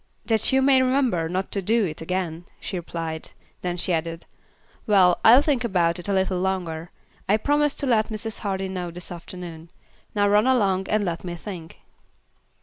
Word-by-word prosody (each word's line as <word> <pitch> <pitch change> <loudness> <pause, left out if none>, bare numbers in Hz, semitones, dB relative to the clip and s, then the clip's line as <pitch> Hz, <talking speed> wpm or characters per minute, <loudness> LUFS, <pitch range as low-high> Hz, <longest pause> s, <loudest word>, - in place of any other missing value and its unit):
"That 220 +1 +2
you 265 0 +3
may 265 -1 +5
remember 255 -11 +1
not 185 +2 -2
to 200 - -1
do 220 +3 +2
it 155 -3 -5
again," 175 -1 -3
she 195 - -5
replied; 165 -2 -5 0.3
then 180 -1 -2
she 180 +1 +1
added, 165 0 -3 0.6
"Well, 185 -4 +5
I'll 245 +5 +8
think 275 -5 +1
about 175 -6 +1
it 175 - -7
a - - +1
little 190 -1 +1
longer. 175 -3 -2 0.4
I 210 - +5
promised 290 +5 +1
to - - 0
let 225 -5 +2
Mrs. 220 0 -4
Hardy 195 -2 -2
know 180 -2 -4
this 175 +1 -7
afternoon. 170 -1 -8 0.5
Now 205 -1 +3
run 210 +4 +4
along 195 -7 +2
and 210 -1 +1
let 170 -2 -3
me 175 -1 -5
think." 170 -2 -9
190 Hz, 180 wpm, -24 LUFS, 170-220 Hz, 0.6 s, I'll